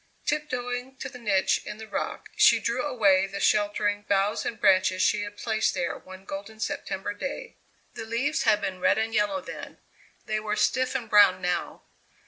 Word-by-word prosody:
Tiptoeing 250 -3 -3
to 265 - -6
the 250 -1 -11
niche 195 -5 +1
in 210 - -7
the 220 0 -9
rock - - -4
she - - +6
drew 235 +2 -1
away 200 -9 +3
the 200 +1 -6
sheltering 205 0 +1
boughs 200 +1 +1
and 230 - -5
branches 185 0 +3
she - - +2
had 205 0 -7
placed 220 -1 0
there 170 - -1
one 185 +1 -12
golden 200 +3 -7
September 220 -5 -3
day. 280 - -6 0.4
The 225 - -7
leaves 255 +8 -1
had 215 -2 +3
been 185 -1 -3
red 190 - +3
and 220 +1 -1
yellow 220 +8 +1
then; - - -9 0.5
they 215 0 -1
were 210 0 -2
stiff 255 +3 +1
and 245 -4 -2
brown 205 -4 +6
now. 180 +1 -3
215 Hz, 180 wpm, -26 LUFS, 195-245 Hz, 0.5 s, she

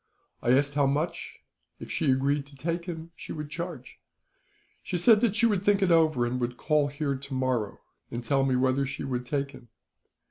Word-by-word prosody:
I - - -1
asked 140 +2 +3
how 140 -1 +3
much, 150 +5 -2 0.4
if - - -8
she 150 - 0
agreed 140 +2 +1
to 145 - -15
take 170 +4 -3
him, 165 -2 -6
she - - -9
would 150 -1 -6
charge. 170 -7 -6 0.8
She 180 - -3
said 210 +5 +5
that 225 -4 +2
she 235 - +3
would 205 -5 +2
think 200 -1 +3
it 185 - +3
over; 155 -7 +4
and 125 +1 -2
would 120 0 -2
call 150 -2 +2
here, 140 -1 -2
tomorrow, 130 -5 -2 0.3
and 120 +1 -5
tell 135 +3 +2
me 135 -1 +2
whether 130 +2 +2
she - - -5
would 125 -2 -3
take 140 -1 -1
him. 130 -2 -14
140 Hz, 200 wpm, -28 LUFS, 130-165 Hz, 0.8 s, said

